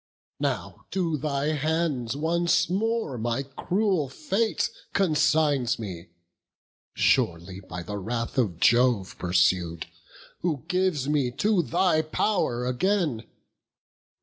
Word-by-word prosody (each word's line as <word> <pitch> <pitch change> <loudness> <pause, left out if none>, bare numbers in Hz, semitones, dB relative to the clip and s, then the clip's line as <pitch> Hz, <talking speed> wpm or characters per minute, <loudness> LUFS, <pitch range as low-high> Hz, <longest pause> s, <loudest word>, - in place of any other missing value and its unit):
Now - - -3
to 175 -4 0
thy 145 0 -1
hands 155 -5 -1
once 170 +3 +1
more 220 - -1
my 120 +4 -1
cruel 175 +3 -1
fate 195 - -1 0.2
Consigns 150 -8 +2
me; 95 -5 -7 0.9
surely 85 +3 +1
by 90 -2 -7
the 105 +4 -5
wrath 115 +5 -2
of 100 -9 0
Jove 120 -4 +3
Pursued, 90 -2 +1 0.5
who 155 -6 -2
gives 180 -6 0
me 145 -4 +1
to 205 - +2
thy 170 0 +2
pow'r 155 - 0
again. 140 - 0
145 Hz, 105 wpm, -26 LUFS, 115-175 Hz, 0.9 s, Jove